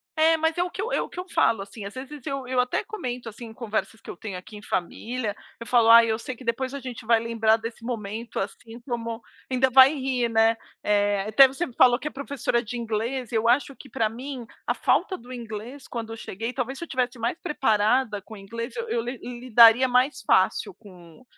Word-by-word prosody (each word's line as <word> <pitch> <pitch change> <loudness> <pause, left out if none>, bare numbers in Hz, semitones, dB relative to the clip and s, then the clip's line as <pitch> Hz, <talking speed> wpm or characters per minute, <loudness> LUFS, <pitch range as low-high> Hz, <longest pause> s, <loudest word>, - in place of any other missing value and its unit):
É, 320 +1 +5
mas 320 +2 0
é 355 - +2
o 360 - -4
que 380 - -5
eu 470 - -3
é - - +1
o - - -4
que 360 - -8
eu 365 - -6
falo, 225 -4 +2
assim, 200 +1 -9
às 200 - -7
vezes 270 +1 -9
eu 275 -3 -4
eu 255 -1 0
até 250 0 +1
comento, 250 - -5
assim, 230 +2 -10
em 220 - -10
conversas 225 -1 -3
que - - -13
eu - - -7
tenho 205 -4 -6
aqui 210 +4 -11
em - - -11
família, 220 +4 -3 0.2
eu 230 - -7
falo: 235 -2 +4
"Ai, 230 0 +8
eu 220 - 0
sei 250 +2 -6
que 255 - -13
depois 255 +3 -2
a 280 - -4
gente 250 -3 -8
vai 230 0 +4
lembrar 225 -1 +2
desse 230 +1 -8
momento, 230 -1 -4
assim, 225 +4 -6
como 230 -2 -4 0.3
ainda 260 +1 +3
vai 265 +3 +8
rir, 260 -4 -1
né". 225 0 +4 0.3
Eh, 205 -1 +2
até 265 +5 +8
você 270 +2 -4
falou 245 0 +5
que 300 - -5
é - - -4
professora 270 -3 -2
de 240 +3 -5
inglês, 235 +2 -3
eu 225 0 +1
acho 270 +2 +2
que 270 - -14
pra 220 0 0
mim 250 +1 -7 0.2
a - - +1
falta 375 - +1
do 245 +2 -14
inglês 240 +3 -7
quando 225 -2 -5
eu - - -8
cheguei, 225 +4 -5
talvez 265 +1 -3
se - - -5
eu - - -7
estivesse 250 -2 -2
mais 235 +8 -1
preparada 220 -4 +1
com 210 +2 -13
o - - -9
inglês 230 - -6
eu 470 -1 -4
eu 230 - 0
lidaria 240 0 +4
mais 255 +2 +2
fácil 190 0 +2
com 180 0 -16
235 Hz, 230 wpm, -25 LUFS, 225-260 Hz, 0.3 s, Ai